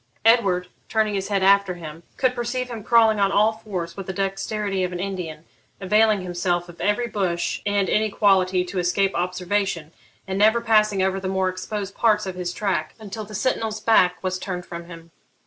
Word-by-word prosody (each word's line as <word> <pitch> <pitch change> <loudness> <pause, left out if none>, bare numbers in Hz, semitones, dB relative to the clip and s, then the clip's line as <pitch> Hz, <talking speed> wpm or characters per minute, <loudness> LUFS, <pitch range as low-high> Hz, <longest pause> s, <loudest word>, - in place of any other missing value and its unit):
Edward, 195 -6 +4 0.2
turning 215 -1 +1
his 195 -1 -2
head 200 -2 0
after 200 -1 +4
him, 160 -2 -9 0.2
could 255 -1 +2
perceive 245 +1 -3
him 225 -3 -6
crawling 225 -2 +4
on 195 -1 +3
all 210 +2 +4
fours 190 -6 -6
with 195 -2 -7
the 190 - -3
dexterity 195 +1 -2
of 180 - -2
an 175 - -5
Indian, 175 -5 -5 0.3
availing 210 +1 +3
himself 175 -1 -1
of 175 -1 -12
every 210 +4 +1
bush 185 -6 -2
and 200 -1 +1
inequality 195 -4 +2
to 185 +1 -4
escape 195 +2 +1
observation, 180 -2 -2 0.4
and 190 +1 -2
never 220 +3 +5
passing 215 -4 +3
over 190 0 0
the 190 - -4
more 190 0 +1
exposed 195 +2 -5
parts 215 -2 +2
of 190 - -4
his 180 -1 -4
track 180 -5 -2
until 215 0 -7
the 210 +1 -9
sentinel's 220 -1 -1
back 185 -6 +4
was 185 0 -2
turned 180 -2 -5
from 170 0 -8
him. 165 -1 -12
195 Hz, 185 wpm, -23 LUFS, 180-215 Hz, 0.4 s, never